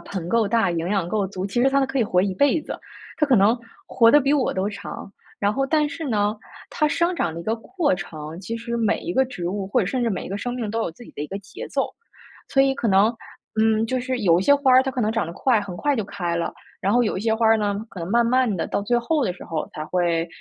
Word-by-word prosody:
盆 185 -4 -6
够 230 -3 +2
大、 225 -4 +2
营 170 0 -2
养 195 -3 0
够 200 +2 0
足， 190 0 -5
其 200 +5 0
实 265 - +5
它 275 0 +2
可 270 0 -2
以 235 - +3
活 180 -3 +2
一 195 -1 0
辈 285 - +3
子， - - -6 0.4
它 300 - +3
可 265 -3 +4
能 205 +3 +5 0.3
活 230 -2 +5
得 295 - +7
比 275 0 +1
我 280 -4 +1
都 190 +1 0
长。 200 -1 -8 0.3
然 205 0 +1
后 270 +3 0
但 305 +1 +2
是 330 +2 -6
呢， 210 -2 +1 0.4
它 305 -1 +1
生 340 +4 +1
长 175 - -1
的 165 - -5
一 - - -7
个 220 - 0
过 295 - -1
程， 160 -3 -7
其 225 +4 -4
实 235 +1 -4
每 225 -3 +1
一 345 - -4
个 265 -4 +3
植 180 -9 -5
物 195 0 -3
或 230 - +1
者 - - +1
甚 245 +6 -1
至 235 - +1
每 200 - -3
一 - - -7
个 195 - -4
生 245 +4 -3
命 230 -4 -3
都 225 +1 -1
有 200 - -1
自 205 +9 -14
己 - - -13
的 - - -7
一 150 - -2
个 195 - -5
节 195 0 -9
奏。 - - 0 0.6
所 270 - +4
以 270 0 +2
可 240 - -1
能， 200 +4 +4 0.5
嗯， 220 0 +3
就 255 +2 -1
是 255 0 -2
有 175 -5 +4
一 - - 0
些 285 - +6
花 280 -2 +3
儿， 255 +1 +7
它 265 - -2
可 260 - -3
能 215 - +1
长 225 -7 0
得 170 - -6
快 235 +1 +2
很 190 -3 -7
快 290 +6 +1
就 220 - -1
开 175 -3 -3
了。 170 - -2 0.3
然 200 0 +1
后 245 +2 +4
有 215 - -1
一 - - -4
些 220 +1 +1
花 225 +1 0
儿 225 0 +6
呢， 205 -1 0 0.2
可 195 - -10
能 165 - -4
慢 235 +2 +4
慢 250 -2 +2
地 165 - -2
到 - - -1
最 240 +4 +1
后 295 +5 0
的 180 - 0
时 180 - -11
候 160 -2 -4
才 155 - -4
会， 170 0 0
220 Hz, 315 characters per minute, -23 LUFS, 190-255 Hz, 0.6 s, 得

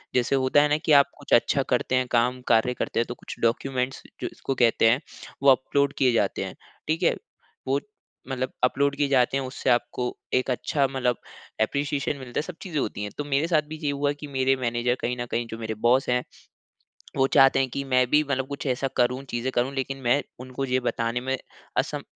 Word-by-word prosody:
जैसे 125 +2 +2
होता 130 +2 +4
है 150 - +3
ना 150 - +3
कि 155 - +2
आप 140 -1 +7
कुछ 145 - -3
अच्छा 135 +3 +4
करते 125 +1 +1
हैं 130 0 +1
काम 125 +1 +2
कार्य 120 +2 +3
करते - - -2
हैं 120 - +2
तो 120 - -5
कुछ - - -9
डॉक्यूमेंट्स 125 +2 -1 0.2
जो - - -1
जिसको 135 - -4
कहते 115 -2 +4
हैं 125 +6 +2 0.4
वो 140 - +7
अपलोड 140 +2 +1
किए 130 -2 +4
जाते - - +1
हैं, - - -8 0.3
ठीक 160 +3 0
है? - - +3 0.5
वो 135 +2 +2 0.5
मतलब 130 0 -2
अपलोड 140 +2 +2
किए 145 -1 +1
जाते 130 0 +3
है - - -1
उससे 130 0 -3
आपको 125 0 +1 0.3
एक 130 +1 +1
अच्छा 140 +3 0
मतलब 125 -2 0 0.5
एप्रीशिएशन 140 +4 0
मिलता 125 -2 -7
है, - - +1
सब 165 +1 -8
चीज़ें 165 -6 -3
होती 105 -4 -3
हैं, 105 - -5
तो 145 - -2
मेरे 145 +3 0
साथ 160 -3 +3
भी 155 - -6
ये 145 - +1
हुआ 145 0 0
कि 150 - -7
मेरे 135 -1 +1
मैनेजर 120 +1 0
कहीं 125 +1 -1
न 120 - -3
कहीं 120 0 0
जो 115 - -7
मेरे 110 -1 -4
बॉस 130 +2 +3
हैं, 125 0 +2 0.9
वो 135 -1 +3
चाहते 135 0 +5
हैं 130 - +1
कि 140 +3 -3
मैं 130 -1 +3
भी 150 +1 +4
मतलब 135 -2 -2
कुछ 140 0 -6
ऐसा 130 +1 0
करूँ, 125 +2 +1
चीज़ें 120 +2 -2
करूँ, 125 +3 0
लेकिन 135 0 -2
मैं 130 +4 +2 0.2
उनको 130 +1 -4
ये 130 0 +1
बताने 120 -1 -1
में 130 +1 -1 0.4
असम - - -1
130 Hz, 220 wpm, -25 LUFS, 125-140 Hz, 0.9 s, आप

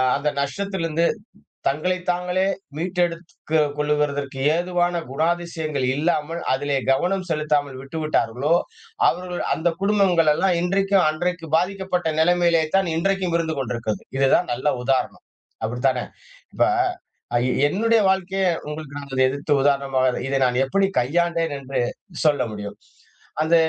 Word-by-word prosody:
அந்த 145 +1 0
நஷ்டத்திலிருந்து 170 +1 -1 0.6
தங்களை 155 +7 +1
தாங்களே 180 +1 0 0.3
மீட்டெடுத்து 175 -1 -2 0.2
கொள்வதற்கு 145 -2 -1 0.2
ஏதுவான 175 0 0
குணாதிசயங்கள் 160 -2 -1
இல்லாமல் 155 +1 -1
அதிலே 140 +1 0
கவனம் 185 +7 +1
செலுத்தாமல் 150 -4 0
விட்டுவிட்டார்களோ, 150 -2 0 0.5
அவர்கள் 180 0 -2
அந்த 175 +2 +1
குடும்பங்கள் 190 -6 +3
எல்லாம் 180 +2 +1
இன்றைக்கும் 195 0 +2
அன்றைக்கு 165 +1 -2
பாதிக்கப்பட்ட 180 -1 -1
நிலைமையிலே 170 0 +3
தான் 190 -3 +1
இன்றைக்கும் 185 0 0
இருந்து 160 -1 -2
கொண்டிருக்கிறது. 115 -4 -3 0.2
இதுதான் 135 +6 +3
நல்ல 130 +5 -3 0.2
உதாரணம். 135 -1 0 0.4
அப்படித்தானே, 125 +2 0 0.5
இப்ப - - +2 0.7
அ - - +5 0.3
என்னுடைய 225 +5 +2
வாழ்க்கையே 190 0 0 0.2
உங்களுக்கு 150 -1 -7
நான் 135 -2 -2
எதிர்த்து 140 +3 -1
உதாரணமாக 135 -2 +1
இதை 135 - +1
நான் 125 - -1
எப்படி 195 +7 +2 0.2
கையாண்டேன் 165 +4 0
என்று 135 0 -3 0.5
சொல்ல 150 -2 +4
முடியும். 105 -1 -7 0.6
அந்த 160 +2 +3
160 Hz, 115 wpm, -22 LUFS, 140-180 Hz, 0.7 s, அ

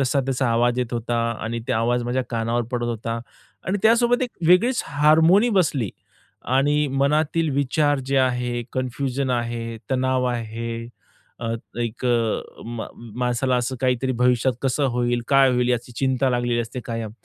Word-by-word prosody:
तसा 135 +1 +2
त्याचा 130 0 -1
आवाज 120 +1 +2
येत 125 -1 -2
होता, 120 0 -1 0.2
आणि 115 +2 -3
त्या - - 0
आवाज 120 +2 +1
माझ्या 125 +2 0
कानावर 115 +1 0
पडत 120 -1 -1
होता. 115 0 -3 0.5
आणि 190 +3 0
त्यासोबत 235 +2 +4
एक 245 - -2 0.2
वेगळीच 220 +9 +4
हार्मोनी 160 +9 +4
बसली 155 - +1 0.7
आणि 145 +2 +2
मनातील 150 +4 +1
विचार 145 +1 +1
जे 135 - 0
आहे, 125 -2 0
कन्फ्युजन 130 +1 -2
आहे, 115 -1 -2
तणाव 130 0 +1
आहे, 115 -1 -4 0.7
अ, 115 -1 -2 0.3
एक 115 +1 -4
अ, 115 -2 -1
म 115 -1 -5 0.3
माणसाला 125 +1 +1
असं 125 +2 -2
काहीतरी 130 0 +1
भविष्यात 125 +1 +3
कसं 135 +2 +1
होईल, 120 0 0
काय 135 -1 +5
होईल 125 0 +1
याची 125 0 -1
चिंता 130 -1 +1
लागलेली 120 -1 0
असते 120 +2 -5
कायम. 115 -2 -4
125 Hz, 155 wpm, -23 LUFS, 120-140 Hz, 0.7 s, काय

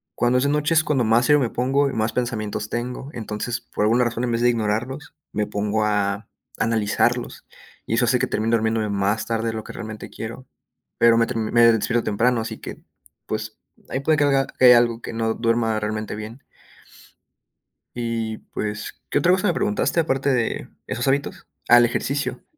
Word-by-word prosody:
cuando 120 +1 +2
es 125 - +1
de - - +2
noche 150 +2 +1
es 160 -1 +4
cuando 135 -5 +1
más 115 +2 +3
serio 150 +2 +4
me 120 - 0
pongo, 135 +4 +1
y - - -6
más 110 0 -1
pensamientos 110 -4 -3
tengo. 125 +3 -4
Entonces, 115 -1 -4
por - - -4
alguna 120 +4 +3
razón, 120 0 -2
en 120 - 0
vez 115 - 0
de 120 - +4
ignorarlos, 120 +6 -2 0.2
me 105 0 0
pongo 105 +1 -1
a 105 0 -1 0.3
analizarlos, 110 -2 0 0.4
y 115 - -1
eso 120 +1 +3
hace 125 +1 +3
que - - 0
termine 115 +2 -1
durmiéndome 110 -1 0
más 100 +2 0
tarde 115 0 -1
de 115 - -1
lo 110 -1 -5
que - - -9
realmente 110 -1 -7
quiero. 115 +3 -8 0.5
Pero 115 0 +5
me 115 0 +3
ter 125 - -4
me 115 +1 0
despierto 115 0 +3
temprano, 115 +4 +2
así 110 - -5
que, - - -8 0.5
pues, - - -5 0.3
ahí 130 - -2
puede 155 +3 +2
que 150 - +3
alga 135 -1 +2
que - - -1
hay 125 - +10
algo 120 -1 +3
que - - -6
no 115 0 0
duerma 115 -1 +1
realmente 110 0 -3
bien. 110 +5 -8 1.5
Y, 115 -2 -2 0.2
pues, 105 -1 -5
¿qué - - +1
otra 170 +5 +3
cosa 190 +3 +2
me 180 - +2
preguntaste 200 -1 0
aparte 140 -3 +1
de 120 -3 -1 0.2
esos 120 - -2
hábitos? 140 +1 -1 0.2
Ah, 120 - +8
el 120 - +6
ejercicio. 140 +4 -2
115 Hz, 195 wpm, -22 LUFS, 110-125 Hz, 1.5 s, hay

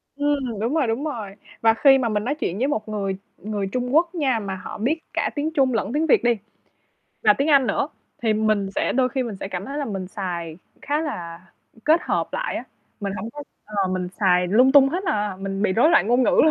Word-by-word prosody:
Ừm, 280 -7 -1
đúng 235 +6 -1
rồi, 290 -7 +2
đúng 230 +6 -1
rồi. 225 -10 -4 0.3
Và 225 0 +5
khi 270 +3 +6
mà 245 -3 0
mình 210 0 -1
nói 280 +5 -1
chuyện 190 - -3
với 260 +4 +1
một 215 -6 -2
người 195 -3 -2 0.2
người 205 -2 -3
Trung 250 +6 -2
Quốc 340 +2 +3
nha 265 -8 +1
mà 195 -2 -4
họ - - -7
biết 280 +10 0
cả - - 0
tiếng 300 +2 -1
Trung 265 -4 +2
lẫn 225 +2 -1
tiếng 310 +2 +1
Việt 265 - +4
đi, 240 - +4 0.9
và 210 - +6
tiếng 280 +9 -1
Anh 275 -3 +5
nữa, 235 +7 0 0.3
thì 225 -2 +2
mình 215 -2 +1
sẽ - - 0
đôi 255 0 +2
khi 265 +1 -1
mình 230 -5 -5
sẽ 195 - -4
cảm 185 0 -4
thấy 280 +5 -5
là 290 - -1
mình 195 -5 -4
xài 175 -5 -5 0.3
khá 295 +1 0
là, 170 - -5 0.4
kết 320 +3 +4
hợp - - -1
lại - - -2
á, - - -5 0.4
mình 200 -1 -3
hổng 215 +5 -5
có 295 +2 -8 0.2
ờ, 200 -3 -1
mình 185 -1 -2
xài 180 -2 +3
lung 250 +8 +4
tung 275 -1 +7
hết 360 +7 -3
à, 205 -2 -1
mình 195 +1 -3
bị 200 - +2
rối 245 - +4
loạn 210 - +4
ngôn 245 +2 +3
ngữ - - +3
luôn. 315 - +5
225 Hz, 245 wpm, -23 LUFS, 200-280 Hz, 0.9 s, tung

